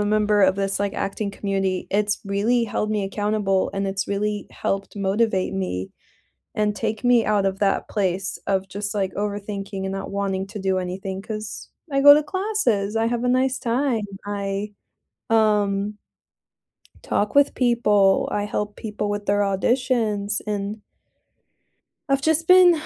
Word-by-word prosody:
a 205 - +1
member 210 0 +2
of 190 0 +4
this 195 0 -1
like 200 -1 -1
acting 200 +1 -2
community, 195 -2 -2
it's 205 +1 +1
really 215 +5 +1
held 215 0 -2
me 210 -2 0
accountable 205 -1 0
and 195 0 -2
it's 195 0 -2
really 205 +1 -2
helped 195 +1 -3
motivate 195 -1 0
me 95 - -3 0.6
and 210 -1 +1
take 220 +2 -3
me 245 -2 +4
out 205 -2 +2
of 195 0 -1
that 195 -1 +1
place 190 -2 -1
of 190 -1 0
just 205 +2 -4
like 195 -2 -1
overthinking 200 -1 -4
and 190 - -3
not 195 0 -5
wanting 195 -1 -2
to 210 +1 -7
do 190 -1 0
anything 190 +1 -4
cause 215 0 -6 0.2
I 275 - +2
go 285 +1 +10
to 300 - +3
classes, 375 - 0
I 225 0 +2
have 240 +1 -1
a - - +2
nice 255 +1 +2
time, 240 -1 0 0.2
I 200 0 -3 0.6
um, 210 -2 +2 1.1
talk 205 +4 -1
with 285 0 +5
people, 210 -6 +3
I 205 - 0
help 210 0 -3
people 210 -1 -4
with 205 0 -3
their 205 0 +2
auditions 210 0 +1
and 205 0 -2 1.3
I've 275 0 +1
just 320 +1 +2
been, 360 -3 +7
205 Hz, 160 wpm, -23 LUFS, 195-225 Hz, 1.3 s, go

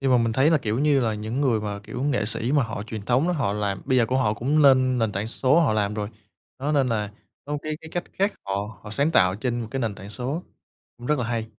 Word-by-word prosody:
nhưng 135 -1 +1
mà, 125 - +6
mình 115 -1 +1
thấy 135 +6 +3
là, 160 - +4
kiểu 110 -2 -2
như 145 -1 +3
là, 110 -3 0
những 110 +5 -3
người 125 -6 +2
mà, 105 -1 -4
kiểu, 125 - -5
nghệ 135 -7 +1
sĩ 115 +4 0
mà 145 -2 +4
họ 110 -2 -5
truyền 110 -2 -6
thống 125 +8 +2
á, 180 - +1
họ 120 -10 0
làm 100 -2 -2
bây 130 -1 +2
giờ 115 - +3
cũng 130 +3 +1
họ 110 -4 +2
cũng 145 +7 +1
nên 130 -2 +5
nền 110 -3 +1
tảng 100 +3 -2
số 130 +7 +3
họ 155 -9 +3
làm 105 -1 0
rồi. 105 -1 -3 0.5
Đó, 140 +3 -1
nên 140 -3 +3
là, 105 -3 -1 0.3
có 145 - -6
một 150 - -1
cái 155 0 -3
cái 160 - -11
cách 175 +1 -2
khác 200 +2 +1
họ 100 +2 -4
họ 105 - -9
sáng 140 +8 +1
tạo 90 - +4
trên 120 +2 -2
một 110 - -6
cái 135 - -2
nền 115 -4 -1
tảng 100 +1 -10
số, 130 +10 -3 0.6
cũng 120 - -8
rất 150 -1 +2
là 125 - -1
hay. 115 -2 -2
120 Hz, 290 wpm, -24 LUFS, 105-140 Hz, 0.6 s, mà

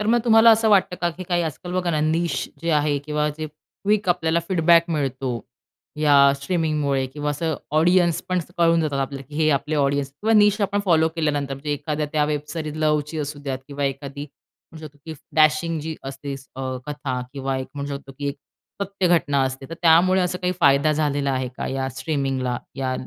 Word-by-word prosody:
तर 210 - -2
मग 240 +2 +4
तुम्हाला 225 0 +7
असं 225 0 +4
वाटतं 195 -3 +3
का 175 -1 +1
की 180 +3 -8
काही 175 -1 0
आजकाल 170 +3 -5
बघा 180 -1 0
ना, 155 -2 0
निश 165 +2 0
जे 170 - 0
आहे 150 -1 +2
किंवा 150 +1 -1
जे 155 - -3
क्विक 200 +6 -3
आपल्याला 170 -1 +2
फीडबॅक 170 -2 +5
मिळतो 135 -5 -2 0.6
या 140 -2 +6
स्ट्रीमिंगमुळे 145 -3 0
किंवा 145 +2 -4
असं 160 +2 -1 0.2
ऑडियन्स 175 0 +3
पण 185 0 +1
असं 175 0 -7
कळून 165 -1 +4
जातात 145 -3 -1
आपल्याला 135 0 -4
की 150 - -12
हे 155 - +3
आपले 150 +2 0
ऑडियन्स 140 -1 +1
किंवा 215 +11 -1
निश 210 0 +5
आपण 200 0 +1
फॉलो 160 -3 +4
केल्यानंतर 145 -3 -1
म्हणजे 145 +2 -6
एखाद्या 150 +1 -2
त्या 150 -1 +2
वेब 150 -1 -1
सेरीज 155 -2 -4
लव्हची 150 0 0
असू 150 0 -4
द्यात 135 -2 -3
किंवा 140 0 -3
एखादी 140 +1 -4 0.5
म्हणू 160 -1 -9
शकतो 145 0 -16
की 160 - -6 0.2
डॅशिंग 155 +2 +3
जी 160 +1 -4
असते 135 +1 -6
स 135 -1 -15
अ, - - -5 0.3
कथा 145 -4 -3
किंवा 135 -1 -2
एक 130 - -5
म्हणू 140 0 -4
शकतो 140 0 -12
की 145 - -2
एक 140 - -4 0.5
सत्य 195 -1 -1
घटना 145 -5 +2
असते, 135 +1 -4
तर - - -4
त्यामुळे 175 +3 +5
असं 180 0 -1
काही 180 0 +1
फायदा 140 +1 +4
झालेला 145 -2 0
आहे 130 -1 -1
का - - -4
या 135 0 -2
स्ट्रीमिंगला? 135 -2 -2 0.2
या 130 -1 -1
150 Hz, 205 wpm, -23 LUFS, 140-170 Hz, 0.6 s, तुम्हाला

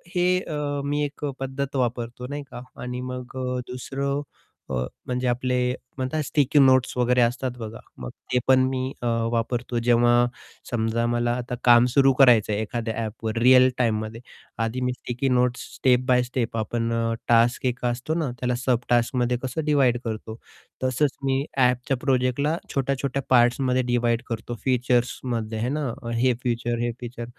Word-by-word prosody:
हे 180 +1 +3
अ, 145 -4 -3
मी 145 +1 0
एक 145 +1 -6
पद्धत 135 +1 -4
वापरतो 120 -1 -2
नाही 145 +1 -5
का, 120 - -7 0.2
आणि 125 0 -4
मग 125 0 -7
अ, 125 -1 -2
दुसरं 140 +3 -3 0.5
अ, - - -2 0.3
म्हणजे, 125 0 -1
आपले 125 +1 0 0.4
म्हणतात. 130 +4 -1
स्टिकी 145 +1 +2
नोट्स 130 -2 +4
वगैरे 125 0 +3
असतात 125 +2 +1
बघा, 110 0 -7 0.2
मग - - -6 0.2
ते 125 - +4
पण 130 0 +6
मी 130 0 -2
अ, - - -4 0.3
वापरतो. 120 +1 -1
जेव्हा 120 0 +4 0.4
समजा 115 0 0
मला 120 0 +1
आता 125 0 -4
काम 120 0 +7
सुरू 135 -1 +5
करायचं 120 -6 +6
आहे 105 - -1
एखाद्या 115 +1 -3
ॲपवर 110 +1 -4
रिअल 130 +1 +7
टाईममध्ये. 110 -1 -1 0.4
आधी 115 +3 -2
मी 125 0 0
sticky 125 +2 -3
notes 125 0 +1
step 125 -2 +3
by 125 -1 +4
step 120 -2 -3
आपण 115 +1 -1 0.4
टास्क 120 +2 +3
एक 125 0 -1
असतो 125 +5 -1
ना, 160 -5 -1
त्याला 125 0 0
सब 125 -1 +1
टास्कमध्ये 120 0 +2
कसं 130 +5 -3
डिव्हाईड 135 -5 +3
करतो. 110 0 -5 0.5
तसंच 130 +2 +1
मी 135 0 +1
ॲपच्या 125 +1 +2
प्रोजेक्टला 130 +3 +1 0.2
छोट्या-छोट्या 140 0 -1
पार्ट्समध्ये 125 +1 +3
डिव्हाईड 120 -1 +1
करतो. 115 0 -4
फीचर्समध्ये 125 -2 0
आहे 120 - -1
ना, 150 +1 -1 0.3
हे 125 0 +3
फीचर, 120 -1 -1
हे 120 0 0
फीचर 120 -1 -6
125 Hz, 160 wpm, -24 LUFS, 120-130 Hz, 0.5 s, काम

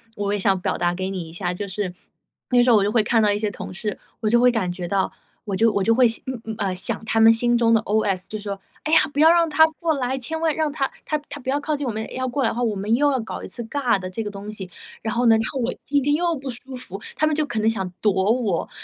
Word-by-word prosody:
我 205 0 -1
也 205 - -1
想 190 -1 +2
表 - - -1
达 175 0 +1
给 190 +1 -3
你 175 -4 -5
一 - - -11
下， 175 0 -2
就 200 +3 -5
是 190 -1 -3 0.6
那 245 -1 +5
时 250 - +3
候 - - +7
我 200 - +3
就 205 - +1
会 220 -1 +3
看 225 +1 +2
到 210 -1 +3
一 205 - +1
些 210 -1 0
同 - - -7
事， 210 +2 -4 0.2
我 215 - +1
就 235 +2 +4
会 250 +1 +5
感 205 -7 -1
觉 175 -1 -5
到 195 +1 0 0.3
我 200 -3 -2
就 225 +3 +4
我 200 - +1
就 230 - +4
会， 250 0 +6 0.2
嗯 260 -2 -4
嗯， 220 -1 -4
呃， 190 -2 -1
想 180 - -2
他 225 - +1
们 225 0 +8
心 240 +1 +2
中 230 -1 +3
的 225 - +4
OS 205 -4 0
就 215 - -4
说： 200 -1 -5 0.2
“哎 310 - -1
呀， - - +8
不 290 - -3
要 320 +2 +7
让 335 -1 +3
她 315 +1 +6
过 330 -3 +1
来， 260 -1 -1
千 320 +6 -4
万 320 -2 +1
让 315 -2 0
她 275 -2 -1
她 305 - -1
她 290 - -7
不 260 - -5
要 280 - +1
靠 300 +1 -1
近 290 -1 -4
我 - - 0
们， 220 0 -5
要 255 0 -2
过 265 +2 -1
来 225 - +3
的 - - -4
话， 245 - -2
我 225 -3 0
们 200 +3 -1
又 285 +4 +3
要 265 - 0
搞 220 - -6
一 - - -7
次 240 - -6
尬 245 0 +1
的 185 - -5
这 205 +5 -4
个 210 - -4
东 205 +1 -8
西。 190 -3 -7 0.3
“然 220 - -2
后 245 +1 +1
呢 225 -1 +7
然 220 - +2
后 270 - -4
我 235 - -1
今 285 -1 +1
天 290 +2 +2
又 340 +2 +1
不 270 -2 -5
舒 255 +2 -9
服， 205 -6 -5
他 310 - +2
们 310 -1 +1
就 310 - +1
可 240 - -5
能 215 - +1
想 190 -5 -2
躲 210 -2 +3 0.2
我， 225 -8 0
225 Hz, 335 characters per minute, -23 LUFS, 200-265 Hz, 0.6 s, 们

